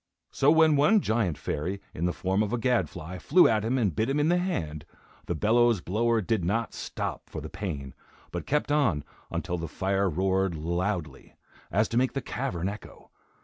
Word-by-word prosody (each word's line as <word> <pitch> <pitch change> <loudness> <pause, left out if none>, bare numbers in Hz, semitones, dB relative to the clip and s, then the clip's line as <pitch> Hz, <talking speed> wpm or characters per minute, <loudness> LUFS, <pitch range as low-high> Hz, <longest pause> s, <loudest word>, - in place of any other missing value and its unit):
So 135 - +3
when 160 -1 +6
one 155 +10 +5
giant 110 - 0
fairy, 90 +9 -3
in 85 - -2
the 90 - +2
form 95 +3 0
of 105 -1 -1
a 120 - +1
gadfly, 90 -8 -1
flew 180 - +5
at 110 -2 +2
him, 120 +4 0
and 100 - +1
bit 110 - 0
him 140 +2 +1
in 150 +2 +2
the 175 +1 +3
hand, 80 - -3 0.4
the 85 - -1
bellows 115 +4 +3
blower 115 +5 +1
did 105 -1 0
not 110 +6 -1
stop - - -5
for - - -5
the - - -8
pain, 70 -10 -5 0.4
but - - -5
kept 150 0 0
on 125 - +2 0.3
until 90 0 -3
the 85 - -4
fire 95 +2 0
roared 95 +1 +1
loudly, 85 -2 -3 0.3
as 105 +4 +2
to 115 - -1
make 130 +1 +2
the 135 - -1
cavern 95 -9 -3
echo. 100 +1 -9
100 Hz, 190 wpm, -27 LUFS, 90-120 Hz, 0.4 s, when